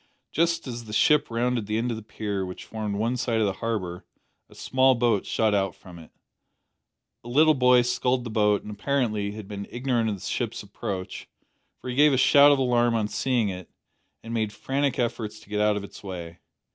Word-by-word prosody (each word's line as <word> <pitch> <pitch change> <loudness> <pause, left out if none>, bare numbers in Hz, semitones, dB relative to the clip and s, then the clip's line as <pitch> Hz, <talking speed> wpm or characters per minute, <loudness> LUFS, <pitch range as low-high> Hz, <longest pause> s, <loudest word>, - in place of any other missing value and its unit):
Just 170 +1 +1
as 120 -3 -6
the 105 - -9
ship 150 +6 +3
rounded 120 -1 -1
the 105 +1 -1
end 120 +2 -1
of - - -2
the 110 - -7
pier, 105 -2 -4
which 90 -1 -7
formed 110 -2 -4
one 115 +4 0
side 115 -2 0
of 110 - +2
the 100 - 0
harbour, 95 -6 -3 0.5
a - - -17
small 130 0 +3
boat 115 -4 +1
shot 110 -2 +1
out 95 -1 0
from 90 -2 -13
it. 80 - -14 1.1
A 120 - -9
little 155 +5 +5
boy 125 -2 +5
sculled 125 +1 0
the 115 - -6
boat, 105 -2 +2
and, 105 - -8
apparently, 105 -3 -1
had 105 -2 -9
been 100 -1 -6
ignorant 120 -2 0
of 105 - -2
the 95 - -13
ship's - - -3
approach, 95 -2 -6 0.5
for - - -9
he 125 - -3
gave 145 +1 +5
a - - +2
shout 140 +2 +7
of 145 - +4
alarm 120 -2 +2
on 110 -2 0
seeing 120 -5 0
it, 90 -1 -7 0.5
and 115 - -7
made 110 -2 -1
frantic 135 +4 -1
efforts 110 -3 -2
to - - -19
get 105 0 -1
out 105 -1 +2
of 100 - -5
its 100 - -11
way. 85 -3 -7
115 Hz, 210 wpm, -25 LUFS, 105-125 Hz, 1.1 s, shout